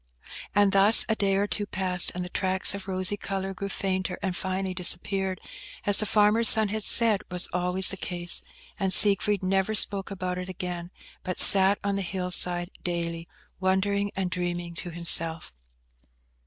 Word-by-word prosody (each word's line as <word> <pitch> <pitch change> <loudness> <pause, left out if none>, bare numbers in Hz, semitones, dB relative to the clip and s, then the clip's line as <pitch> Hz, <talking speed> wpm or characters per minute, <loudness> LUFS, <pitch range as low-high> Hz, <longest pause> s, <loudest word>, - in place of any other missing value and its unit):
And 205 -1 +3
thus 200 +3 +6
a 220 - -1
day 195 -2 -1
or 200 +1 0
two 205 0 -3
passed, 185 -3 -1
and 180 0 -5
the - - -9
tracts 190 0 +1
of 200 -1 -8
rosy 185 +1 -2
colour 195 -1 -5
grew 200 +1 -7
fainter, 185 -1 -4
and 190 -2 -3
finally 190 +1 -3
disappeared, 185 +1 0 0.5
as 205 -1 +2
the 215 - -1
farmer's 215 +2 +3
son 220 -2 +4
had 220 +2 -3
said 220 -1 +2
was 180 -1 0
always 180 +1 0
the 195 - -5
case; 175 -2 0 0.4
and 190 -1 -1
Siegfried 200 0 +4
never 195 +3 -1
spoke 200 -1 +3
about 180 -2 -5
it 180 +1 -8
again, 175 -1 -7 0.3
but 185 - -5
sat 195 +1 +6
on 200 0 -2
the - - -3
hill 180 0 -5
side 175 0 +1
daily, 170 -1 -4 0.3
wondering 200 +2 -1
and 185 -2 -4
dreaming 175 -1 -5
to 175 +1 -8
himself. 165 - 0
190 Hz, 170 wpm, -25 LUFS, 180-200 Hz, 0.5 s, thus